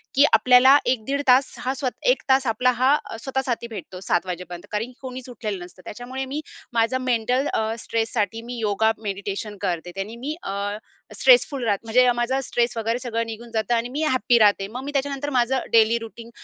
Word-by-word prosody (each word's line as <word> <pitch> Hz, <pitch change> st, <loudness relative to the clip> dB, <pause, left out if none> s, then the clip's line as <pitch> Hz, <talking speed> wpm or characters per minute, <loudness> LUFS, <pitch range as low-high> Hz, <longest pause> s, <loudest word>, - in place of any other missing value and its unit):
की 285 Hz, +2 st, +6 dB
आपल्याला 255 Hz, +3 st, +7 dB
1 245 Hz, -3 st, 0 dB
दीड 280 Hz, +1 st, -1 dB
तास 255 Hz, +2 st, +4 dB
हा 260 Hz, +1 st, -2 dB
स्वत 255 Hz, -2 st, -2 dB, 0.2 s
1 -, -, +2 dB
तास 265 Hz, -1 st, +4 dB
आपला 250 Hz, +3 st, +2 dB
हा 270 Hz, +3 st, +5 dB, 0.3 s
स्वतःसाठी 265 Hz, -3 st, -2 dB
भेटतो 185 Hz, -2 st, -8 dB
07:00 180 Hz, -2 st, -3 dB
कारण 225 Hz, +4 st, -2 dB
कोणीच 255 Hz, -1 st, -7 dB
उठलेलं 210 Hz, -6 st, -5 dB
नसतं 180 Hz, +1 st, -16 dB
त्याच्यामुळे 255 Hz, +4 st, -6 dB
मी 285 Hz, +4 st, -4 dB, 0.3 s
माझं 230 Hz, +2 st, +2 dB
मेंटल 250 Hz, +2 st, +1 dB
अ, 220 Hz, +1 st, 0 dB
स्ट्रेससाठी 225 Hz, 0 st, -2 dB
मी 245 Hz, 0 st, -6 dB
योगा 220 Hz, +1 st, +2 dB
मेडिटेशन 200 Hz, +1 st, -4 dB
करते, 175 Hz, 0 st, -2 dB
त्यानी 205 Hz, +4 st, -5 dB
मी 290 Hz, +5 st, -4 dB
अ, 200 Hz, +1 st, -3 dB, 0.4 s
स्ट्रेसफुल 305 Hz, -, +4 dB
राहते 205 Hz, +1 st, 0 dB
म्हणजे 250 Hz, +2 st, +4 dB
माझा 245 Hz, +3 st, 0 dB
स्ट्रेस 240 Hz, -1 st, -1 dB
वगैरे 230 Hz, +2 st, -1 dB
सगळं 230 Hz, -2 st, -2 dB
निघून 230 Hz, +1 st, -8 dB
जातं 220 Hz, +1 st, 0 dB
आणि 235 Hz, +1 st, -1 dB
मी 295 Hz, +4 st, -3 dB
हॅप्पी 255 Hz, -4 st, +3 dB
राहते. 205 Hz, -2 st, +4 dB
मग 250 Hz, +5 st, -7 dB
मी 285 Hz, -, -5 dB
त्याच्यानंतर 280 Hz, +1 st, -2 dB
माझं 255 Hz, +1 st, +2 dB
डेली 225 Hz, +1 st, +5 dB
रूटीन 230 Hz, +1 st, -10 dB
235 Hz, 185 wpm, -23 LUFS, 215-260 Hz, 0.4 s, आपल्याला